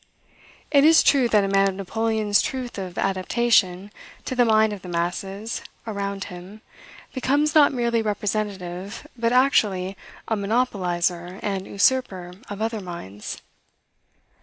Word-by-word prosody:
It 280 Hz, -1 st, +5 dB
is 320 Hz, +1 st, +7 dB
true 265 Hz, -4 st, +4 dB
that 210 Hz, -2 st, +4 dB
a -, -, 0 dB
man 195 Hz, 0 st, +3 dB
of 190 Hz, -, -5 dB
Napoleon's 215 Hz, +1 st, +1 dB
truth 250 Hz, -5 st, -4 dB
of 185 Hz, -2 st, -6 dB
adaptation 195 Hz, 0 st, +1 dB, 0.3 s
to 260 Hz, -, -3 dB
the 245 Hz, -1 st, +4 dB
mind 220 Hz, -1 st, +3 dB
of 200 Hz, -, -8 dB
the 180 Hz, -, -9 dB
masses 195 Hz, +5 st, -3 dB, 0.2 s
around 200 Hz, -2 st, -3 dB
him 185 Hz, +3 st, -10 dB, 0.5 s
becomes 285 Hz, +3 st, +1 dB
not 300 Hz, -2 st, +6 dB
merely 235 Hz, -3 st, 0 dB
representative, 200 Hz, -1 st, -3 dB
but 230 Hz, -1 st, 0 dB
actually 205 Hz, -8 st, +2 dB, 0.3 s
a 220 Hz, -, +1 dB
monopolizer 185 Hz, -5 st, -1 dB
and 195 Hz, -2 st, -2 dB
usurper 195 Hz, -6 st, +1 dB, 0.2 s
of 205 Hz, +1 st, -4 dB
other 225 Hz, -1 st, -2 dB
minds. 140 Hz, -, -8 dB
205 Hz, 135 wpm, -23 LUFS, 185-235 Hz, 0.5 s, is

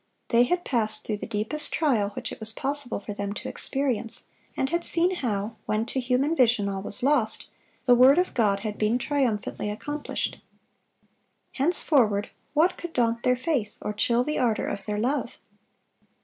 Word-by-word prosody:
They 235 Hz, +1 st, +5 dB
had 355 Hz, +7 st, -1 dB
passed 215 Hz, -4 st, 0 dB
through 215 Hz, -, -2 dB
the -, -, -6 dB
deepest 225 Hz, +8 st, -1 dB
trial 240 Hz, -11 st, +1 dB
which -, -, -4 dB
it -, -, -8 dB
was 220 Hz, 0 st, 0 dB
possible 275 Hz, +1 st, -1 dB
for 205 Hz, -, -7 dB
them 200 Hz, 0 st, -4 dB
to -, -, -6 dB
experience, 255 Hz, -5 st, -1 dB, 0.3 s
and 265 Hz, -, 0 dB
had 340 Hz, 0 st, 0 dB
seen 350 Hz, +2 st, +2 dB
how, 220 Hz, -4 st, -2 dB
when 215 Hz, +1 st, 0 dB
to 265 Hz, -, -3 dB
human 260 Hz, +5 st, +1 dB
vision 235 Hz, -7 st, +3 dB
all 195 Hz, -1 st, -3 dB
was 245 Hz, +5 st, -4 dB
lost, 260 Hz, -6 st, +2 dB, 0.4 s
the 250 Hz, -, +6 dB
word 255 Hz, +4 st, +7 dB
of 360 Hz, +1 st, +1 dB
God 200 Hz, -4 st, +2 dB
had 210 Hz, -1 st, -5 dB
been 215 Hz, +3 st, +2 dB
triumphantly 250 Hz, -6 st, -1 dB
accomplished. 290 Hz, +8 st, -3 dB, 1.1 s
Henceforward 260 Hz, -, +2 dB, 0.2 s
what 340 Hz, +5 st, +3 dB
could 345 Hz, -1 st, -7 dB
daunt 235 Hz, -1 st, +1 dB
their 250 Hz, +1 st, +2 dB
faith, 255 Hz, -6 st, -1 dB
or 210 Hz, -, -4 dB
chill 235 Hz, +3 st, +2 dB
the 300 Hz, +3 st, -2 dB
ardor 230 Hz, -4 st, +1 dB
of 200 Hz, +1 st, -5 dB
their 210 Hz, 0 st, -1 dB
love? 255 Hz, +7 st, -1 dB
245 Hz, 175 wpm, -26 LUFS, 215-285 Hz, 1.1 s, word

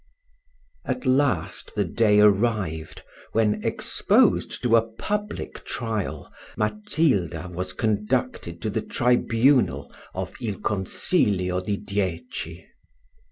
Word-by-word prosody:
At 255 Hz, -, -3 dB
last 130 Hz, -, +1 dB
the 105 Hz, -2 st, +1 dB
day 105 Hz, +3 st, +3 dB
arrived, 100 Hz, -6 st, +1 dB, 0.3 s
when, 110 Hz, -2 st, +2 dB
exposed -, -, +2 dB
to 120 Hz, -2 st, +4 dB
a 115 Hz, -, +6 dB
public 205 Hz, -, -4 dB
trial, 110 Hz, -5 st, -4 dB, 0.2 s
Matilda 105 Hz, -, 0 dB
was 90 Hz, +1 st, -3 dB
conducted 105 Hz, -5 st, -1 dB
to 110 Hz, -, -1 dB
the 110 Hz, +1 st, -1 dB
tribunal 120 Hz, -, +2 dB, 0.2 s
of 95 Hz, 0 st, -4 dB
il 110 Hz, -4 st, -2 dB
consiglio 95 Hz, -, 0 dB
di 100 Hz, +1 st, -1 dB
dieci. 95 Hz, -3 st, -4 dB
105 Hz, 100 wpm, -25 LUFS, 90-115 Hz, 0.3 s, a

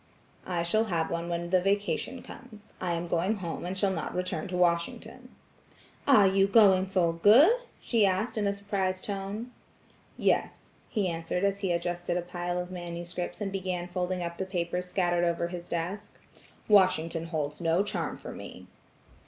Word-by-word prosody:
"I 175 Hz, -2 st, -1 dB
shall 215 Hz, +6 st, +2 dB
have 165 Hz, -6 st, -1 dB
one 170 Hz, 0 st, -2 dB
when 170 Hz, 0 st, -3 dB
the 185 Hz, -1 st, +4 dB
vacation 205 Hz, +6 st, -1 dB
comes. 220 Hz, -4 st, -13 dB
I 180 Hz, -2 st, 0 dB
am 170 Hz, +1 st, -2 dB
going 175 Hz, +6 st, +1 dB
home 175 Hz, -5 st, -4 dB
and 180 Hz, -, -3 dB
I -, -, -6 dB
shall 195 Hz, 0 st, +2 dB
not 160 Hz, -4 st, -4 dB
return 180 Hz, -3 st, -2 dB
to 180 Hz, -1 st, -3 dB
Washington." 170 Hz, -1 st, -1 dB, 0.8 s
"Are 220 Hz, -8 st, +7 dB
you 195 Hz, 0 st, +4 dB
going 195 Hz, -3 st, +5 dB
for 180 Hz, -3 st, +2 dB
good?" 215 Hz, -, +7 dB, 0.3 s
she 230 Hz, -3 st, +1 dB
asked 195 Hz, +4 st, +1 dB
in 210 Hz, -2 st, 0 dB
a 200 Hz, -, +1 dB
surprised 195 Hz, -2 st, -2 dB
tone. 200 Hz, +4 st, -4 dB, 0.7 s
"Yes," -, -, 0 dB, 0.2 s
he 210 Hz, -5 st, 0 dB
answered 165 Hz, +2 st, -2 dB
as 200 Hz, 0 st, +1 dB
he 195 Hz, -3 st, -1 dB
adjusted 175 Hz, 0 st, -1 dB
a 175 Hz, -, -2 dB
pile 175 Hz, 0 st, -3 dB
of 180 Hz, 0 st, -4 dB
manuscript, 175 Hz, 0 st, -5 dB
and 200 Hz, -1 st, -2 dB
began 185 Hz, -2 st, -3 dB
folding 180 Hz, 0 st, -2 dB
up 170 Hz, 0 st, -5 dB
the 190 Hz, -, -1 dB
papers 180 Hz, -1 st, -2 dB
scattered 175 Hz, -2 st, +1 dB
over 170 Hz, 0 st, 0 dB
his 175 Hz, -1 st, -7 dB
desk. 180 Hz, +5 st, -4 dB, 0.5 s
"Washington 170 Hz, -5 st, +3 dB
holds 150 Hz, -2 st, -3 dB
no 170 Hz, +3 st, +2 dB
charm 205 Hz, +1 st, -3 dB
for -, -, -8 dB
me." -, -, -9 dB
180 Hz, 175 wpm, -29 LUFS, 170-200 Hz, 0.8 s, Are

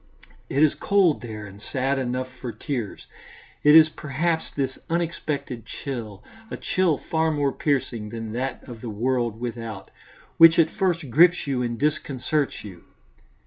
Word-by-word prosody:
It 140 Hz, +3 st, +3 dB
is 155 Hz, -, +5 dB
cold 195 Hz, -6 st, +2 dB
there 110 Hz, -4 st, -7 dB
and 100 Hz, 0 st, -12 dB
sad 135 Hz, +2 st, -1 dB
enough 130 Hz, 0 st, -2 dB
for 125 Hz, -, -5 dB
tears. 115 Hz, 0 st, -5 dB, 0.6 s
It 150 Hz, +1 st, +7 dB
is 160 Hz, -1 st, +9 dB
perhaps 155 Hz, +2 st, -2 dB
this 135 Hz, -2 st, -3 dB
unexpected 150 Hz, -7 st, -2 dB
chill, 110 Hz, -7 st, -6 dB, 0.3 s
a -, -, -5 dB
chill 180 Hz, -6 st, +1 dB
far 160 Hz, +3 st, 0 dB
more 145 Hz, -3 st, +1 dB
piercing 125 Hz, -7 st, -1 dB
than 115 Hz, 0 st, -6 dB
that 125 Hz, +3 st, -3 dB
of 120 Hz, -3 st, -9 dB
the 120 Hz, -, -5 dB
world 120 Hz, +1 st, -1 dB
without, 115 Hz, -5 st, -6 dB, 0.5 s
which 165 Hz, 0 st, +8 dB
at 160 Hz, -2 st, +4 dB
first 175 Hz, -, -1 dB
grips 175 Hz, +6 st, +5 dB
you 135 Hz, -3 st, -1 dB
and 120 Hz, -1 st, -2 dB
disconcerts 150 Hz, 0 st, -1 dB
you. 95 Hz, -5 st, -11 dB
135 Hz, 150 wpm, -24 LUFS, 115-155 Hz, 0.6 s, is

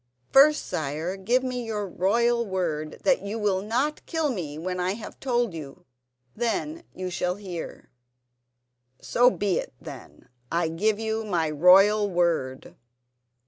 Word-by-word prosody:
"First, 300 Hz, +3 st, +6 dB
sire, 155 Hz, +5 st, -3 dB
give 235 Hz, +7 st, +1 dB
me 250 Hz, -1 st, -3 dB
your 210 Hz, -3 st, -3 dB
royal 235 Hz, +7 st, +1 dB
word 170 Hz, -7 st, -3 dB
that 275 Hz, -2 st, +3 dB
you 200 Hz, +3 st, -4 dB
will 200 Hz, -3 st, 0 dB
not 250 Hz, +9 st, -1 dB
kill 320 Hz, -3 st, 0 dB
me 160 Hz, -, -5 dB
when 180 Hz, +3 st, -4 dB
I 180 Hz, +1 st, 0 dB
have 215 Hz, +1 st, -9 dB
told 240 Hz, -6 st, 0 dB
you. 150 Hz, -4 st, -9 dB, 0.5 s
Then 240 Hz, -, -2 dB
you 185 Hz, 0 st, -4 dB
shall 180 Hz, +1 st, -1 dB
hear." 185 Hz, -5 st, -8 dB, 1.1 s
"So 245 Hz, +1 st, +4 dB
be 205 Hz, -6 st, 0 dB
it, -, -, -7 dB
then; -, -, -11 dB, 0.2 s
I 170 Hz, -1 st, +1 dB
give 205 Hz, +6 st, +1 dB
you 220 Hz, 0 st, -2 dB
my 170 Hz, -7 st, 0 dB
royal 195 Hz, +6 st, +5 dB
word." 170 Hz, -8 st, -1 dB
200 Hz, 145 wpm, -26 LUFS, 175-235 Hz, 1.1 s, First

